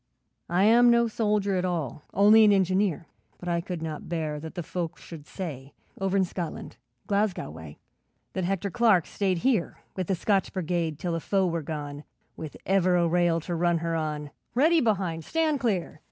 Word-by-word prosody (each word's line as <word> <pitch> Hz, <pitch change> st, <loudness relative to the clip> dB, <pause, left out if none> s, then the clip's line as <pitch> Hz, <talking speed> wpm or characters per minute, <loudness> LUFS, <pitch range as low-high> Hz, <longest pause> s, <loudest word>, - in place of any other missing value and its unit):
'I 175 Hz, +3 st, +2 dB
am 235 Hz, +3 st, +6 dB
no 235 Hz, 0 st, +4 dB
soldier 210 Hz, -3 st, 0 dB
at 180 Hz, -, 0 dB
all, 160 Hz, -7 st, -2 dB
Only 210 Hz, +3 st, +6 dB
an 210 Hz, -, +6 dB
engineer, 190 Hz, -3 st, +1 dB, 0.3 s
But 180 Hz, -, -10 dB
I 170 Hz, 0 st, +1 dB
could 170 Hz, -2 st, -5 dB
not 155 Hz, -1 st, -6 dB
bear 155 Hz, -3 st, -2 dB
that 160 Hz, +3 st, -8 dB
the 175 Hz, -, -3 dB
folk 175 Hz, +1 st, -4 dB
should 155 Hz, -3 st, -11 dB
say, 145 Hz, -8 st, -7 dB, 0.3 s
Over 195 Hz, 0 st, 0 dB
in 190 Hz, -, +3 dB
Scotland 175 Hz, -2 st, -6 dB, 0.3 s
Glasgow 200 Hz, -, 0 dB
way 80 Hz, -2 st, -10 dB, 0.6 s
That 185 Hz, -, -2 dB
Hector 195 Hz, +2 st, -1 dB
Clark 220 Hz, -7 st, +4 dB
stayed 190 Hz, -3 st, -1 dB
here 230 Hz, -10 st, +1 dB, 0.2 s
With 185 Hz, -3 st, -3 dB
the 190 Hz, -, +1 dB
Scotch 195 Hz, +2 st, +1 dB
Brigade 170 Hz, -4 st, -1 dB
till 170 Hz, +2 st, -3 dB
the 165 Hz, -, -1 dB
foe 195 Hz, +3 st, +1 dB
were 170 Hz, -2 st, -1 dB
gone, 145 Hz, -1 st, -6 dB, 0.3 s
With 155 Hz, -2 st, -8 dB
ever 185 Hz, -1 st, +3 dB
a 170 Hz, -1 st, +3 dB
rail 170 Hz, 0 st, +2 dB
to 175 Hz, -, -5 dB
run 170 Hz, 0 st, +2 dB
her 165 Hz, 0 st, -2 dB
on. 150 Hz, -2 st, -3 dB, 0.2 s
Ready 320 Hz, +5 st, +4 dB
behind! 185 Hz, -8 st, 0 dB
Stand 315 Hz, -, 0 dB
clear! 205 Hz, -9 st, -1 dB
180 Hz, 185 wpm, -27 LUFS, 165-200 Hz, 0.6 s, am